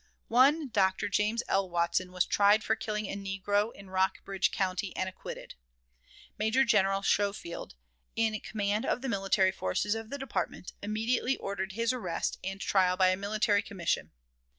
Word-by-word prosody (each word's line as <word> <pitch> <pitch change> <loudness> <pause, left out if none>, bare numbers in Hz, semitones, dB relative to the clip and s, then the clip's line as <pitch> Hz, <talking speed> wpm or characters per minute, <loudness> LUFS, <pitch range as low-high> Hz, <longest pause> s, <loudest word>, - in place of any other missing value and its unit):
One 275 +5 +4
Dr. 195 -2 +2
James 210 +4 +1
L. 195 -1 +1
Watson 175 +1 0
was 180 -1 +1
tried 205 +1 +4
for 220 - +1
killing 215 -1 -3
a 195 - -4
negro 200 +2 -1
in 195 -3 -13
Rockbridge 190 0 +1
County, 190 0 -2
and 185 - -1
acquitted. 190 - -8 0.9
Major 225 +5 +3
General 195 -3 +3
Schofield, 200 - -1 0.4
in 220 -1 +1
command 205 0 -1
of 250 - -1
the 265 - -2
military 195 -2 +2
forces 190 - -1
of 225 0 -5
the 280 - -4
department, 265 -8 -4
immediately 225 +5 0
ordered 190 -1 -4
his 230 +3 +1
arrest 185 -10 -2
and 195 +1 -4
trial 185 -2 +2
by 185 -1 +5
a 185 - +2
military 205 +2 +1
commission. 175 -5 -2
200 Hz, 155 wpm, -30 LUFS, 190-220 Hz, 0.9 s, by